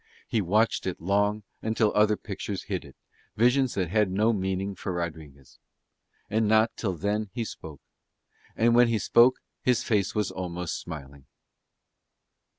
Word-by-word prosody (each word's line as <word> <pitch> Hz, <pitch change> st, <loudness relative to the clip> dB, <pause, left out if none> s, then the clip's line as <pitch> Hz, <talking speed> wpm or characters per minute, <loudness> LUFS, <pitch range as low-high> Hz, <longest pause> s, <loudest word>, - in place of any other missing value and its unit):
He 110 Hz, -, 0 dB
watched 105 Hz, +5 st, +1 dB
it 90 Hz, -, -3 dB
long 105 Hz, +4 st, +1 dB, 0.2 s
until 110 Hz, -1 st, +1 dB
other 105 Hz, 0 st, +3 dB
pictures -, -, -5 dB
hid -, -, -4 dB
it, -, -, -15 dB, 0.4 s
visions 125 Hz, +3 st, +3 dB
that 90 Hz, -4 st, -1 dB
had 105 Hz, -1 st, +2 dB
no 105 Hz, +5 st, +2 dB
meaning 95 Hz, 0 st, -2 dB
for 95 Hz, 0 st, -5 dB
Rodriguez. 80 Hz, -6 st, -7 dB, 0.7 s
And 110 Hz, +1 st, +1 dB
not 110 Hz, +1 st, +3 dB
till 95 Hz, -5 st, -2 dB
then 105 Hz, +4 st, -2 dB
he 120 Hz, -2 st, -2 dB
spoke. 75 Hz, -8 st, -9 dB, 0.7 s
And 115 Hz, +1 st, +3 dB
when 120 Hz, 0 st, +6 dB
he 115 Hz, -1 st, +1 dB
spoke 120 Hz, +6 st, +5 dB, 0.3 s
his 125 Hz, -3 st, +2 dB
face 105 Hz, -3 st, 0 dB
was 105 Hz, -2 st, 0 dB
almost 90 Hz, -2 st, -4 dB
smiling. 70 Hz, -4 st, -9 dB
105 Hz, 150 wpm, -27 LUFS, 90-110 Hz, 0.7 s, when